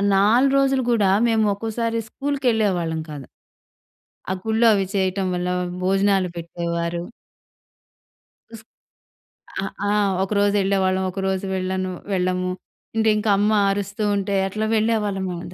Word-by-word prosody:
4 230 Hz, +8 st, +4 dB
రోజులు 270 Hz, -1 st, +2 dB
గూడా 215 Hz, -5 st, +3 dB, 0.2 s
మేము 220 Hz, -1 st, +2 dB
ఒకోసారి 225 Hz, +2 st, -2 dB
స్కూల్‌కెళ్ళేవాళ్ళం 220 Hz, -, 0 dB
కాదు. 145 Hz, -4 st, -8 dB, 1.1 s
ఆ -, -, +1 dB
గుళ్లో 225 Hz, +1 st, +3 dB
అవి 195 Hz, -2 st, +1 dB
చేయటం 190 Hz, 0 st, 0 dB
వల్ల 180 Hz, 0 st, -2 dB, 0.3 s
భోజనాలు 195 Hz, 0 st, +2 dB
పెట్టేవారు. 170 Hz, 0 st, -3 dB, 1.6 s
స్ -, -, -15 dB, 1.0 s
ఆహ్, 195 Hz, -, -4 dB, 0.2 s
ఆ! -, -, +1 dB, 0.3 s
ఒకరోజెళ్ళేవాళ్ళం. 195 Hz, -2 st, +1 dB
ఒకరోజు 190 Hz, 0 st, -2 dB
వెళ్ళను, 185 Hz, 0 st, -2 dB, 0.2 s
వెళ్ళము. 185 Hz, 0 st, 0 dB, 0.4 s
అంటే 220 Hz, 0 st, +3 dB
ఇంకమ్మ 210 Hz, 0 st, +2 dB, 0.2 s
అరుస్తూ 200 Hz, +1 st, -3 dB
ఉంటే 200 Hz, 0 st, -1 dB
అట్లా 215 Hz, +3 st, -2 dB
వెళ్ళేవాళ్ళమంత. 200 Hz, -5 st, -1 dB
195 Hz, 105 wpm, -22 LUFS, 185-220 Hz, 1.6 s, 4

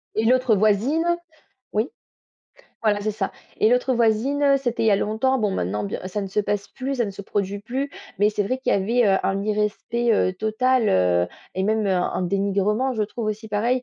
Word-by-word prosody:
Et 220 Hz, -, +1 dB
l'autre 250 Hz, -2 st, +4 dB
voisine 215 Hz, -, +2 dB, 0.7 s
oui, 215 Hz, +6 st, 0 dB, 0.9 s
voilà, 210 Hz, -2 st, +2 dB
c'est 215 Hz, -, -1 dB
ça 200 Hz, -2 st, -3 dB, 0.3 s
et 215 Hz, -, +4 dB
l'autre 250 Hz, +1 st, +2 dB
voisine, 265 Hz, +5 st, +3 dB
c'était 240 Hz, -4 st, -2 dB
il -, -, +2 dB
y -, -, +5 dB
a 200 Hz, -, +4 dB
longtemps. 225 Hz, +6 st, +1 dB
Bon, 210 Hz, -2 st, +1 dB
maintenant, 105 Hz, -, -2 dB
bien 100 Hz, -, -4 dB
ça 195 Hz, +3 st, -3 dB
ne 195 Hz, -, -4 dB
se 195 Hz, -, -3 dB
passe 205 Hz, -1 st, -2 dB
plus, 270 Hz, +1 st, -4 dB
ça 240 Hz, -, +1 dB
ne 205 Hz, -, -4 dB
se 200 Hz, +1 st, -9 dB
produit 200 Hz, 0 st, -2 dB
plus 265 Hz, +6 st, -3 dB, 0.3 s
mais 205 Hz, +1 st, +4 dB
c'est 205 Hz, -1 st, -1 dB
vrai 255 Hz, +6 st, -1 dB
qu'il 260 Hz, -, 0 dB
y -, -, +4 dB
avait, 230 Hz, +5 st, +2 dB
heu, 195 Hz, -1 st, +4 dB
un 195 Hz, +1 st, 0 dB
irrespect, 215 Hz, +3 st, 0 dB
heu, 185 Hz, -, +2 dB
total, 220 Hz, +4 st, +1 dB
heu 90 Hz, -1 st, +3 dB, 0.3 s
et 190 Hz, -, -1 dB
même, 215 Hz, +1 st, +1 dB
heu, -, -, +1 dB
un 185 Hz, 0 st, 0 dB
dénigrement, 200 Hz, +6 st, 0 dB
je 220 Hz, -, 0 dB
trouve 215 Hz, +2 st, -4 dB
aussi 215 Hz, +1 st, -4 dB
pareil 235 Hz, +5 st, 0 dB
215 Hz, 215 wpm, -23 LUFS, 200-245 Hz, 0.9 s, y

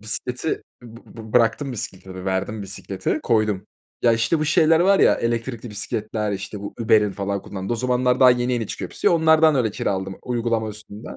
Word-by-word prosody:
Bisikleti 125 Hz, +7 st, -2 dB, 0.2 s
bı 115 Hz, -1 st, -12 dB, 0.2 s
bı 110 Hz, -1 st, -10 dB
bıraktım, 125 Hz, +4 st, +2 dB
bisikleti 95 Hz, -4 st, -6 dB
verdim, 100 Hz, +3 st, -2 dB
bisikleti 100 Hz, +6 st, -3 dB
koydum. 110 Hz, -4 st, +1 dB, 0.4 s
Ya, 120 Hz, -, +5 dB
işte, 115 Hz, +8 st, +1 dB
bu 155 Hz, -, 0 dB
şeyler 160 Hz, 0 st, +4 dB
var 195 Hz, +2 st, +4 dB
ya -, -, +6 dB
elektrikli 115 Hz, 0 st, -3 dB
bisikletler, 105 Hz, +1 st, -3 dB
işte, 100 Hz, +1 st, -6 dB
bu 100 Hz, -, -7 dB
Uber'in 105 Hz, -3 st, +3 dB
falan 100 Hz, 0 st, -3 dB
kullandığı 95 Hz, +2 st, -5 dB
o -, -, 0 dB
zamanlar 125 Hz, +1 st, +1 dB
daha 130 Hz, -, +8 dB
yeni 125 Hz, 0 st, +1 dB
yeni 115 Hz, -3 st, -1 dB
çıkıyor -, -, -6 dB
hepsi. -, -, +1 dB
Onlardan 160 Hz, -1 st, +4 dB
öyle 115 Hz, -4 st, +1 dB
kiraladım 95 Hz, -1 st, -3 dB
uygulama 115 Hz, -2 st, -1 dB
üstünden. 105 Hz, +1 st, -9 dB
115 Hz, 175 wpm, -22 LUFS, 100-125 Hz, 0.4 s, daha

